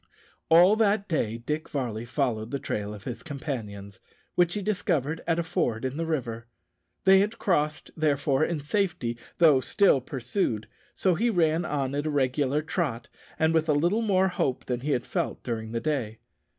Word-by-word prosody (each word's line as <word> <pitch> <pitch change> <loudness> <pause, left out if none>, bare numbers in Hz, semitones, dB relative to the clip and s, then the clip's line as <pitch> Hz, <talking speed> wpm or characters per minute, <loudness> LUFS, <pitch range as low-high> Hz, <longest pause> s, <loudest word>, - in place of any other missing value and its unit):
All 175 +5 +7
that 205 -2 +2
day 115 - -1
Dick 150 +6 -4
Varley 120 -5 -3
followed 120 -4 -1
up - - -15
the 140 - -2
trail 105 -6 -3
of 105 -1 -9
his 120 -1 -6
companions, 105 - -6 0.3
which 175 -1 +2
he 205 - -2
discovered 165 -7 -1
at 165 -1 +2
a 170 - 0
ford 120 -7 -1
in 130 +1 -2
the 165 0 -2
river. 120 -7 -3 0.6
They 190 0 +7
had 210 +3 0
crossed, 155 -5 0
therefore, 145 -2 +1
in 165 -1 -1
safety, 155 - -1 0.2
though 155 -6 +6
still 140 +2 +3
pursued; 125 - -2 0.3
so 185 - +2
he 230 +8 +1
ran 170 -4 +2
on 140 -3 -2
at 145 +2 -1
a - - 0
regular 140 +1 +1
trot, 150 -8 -2 0.3
and 160 0 +2
with 160 0 +1
a - - +5
little 175 +10 +2
more 190 -3 +3
hope 135 -7 -1
than 125 -1 -2
he 140 +4 -4
had 120 - -1
felt - - -3
during 110 -2 -4
the 115 - -1
day. 120 -6 -2
145 Hz, 185 wpm, -27 LUFS, 120-170 Hz, 0.6 s, All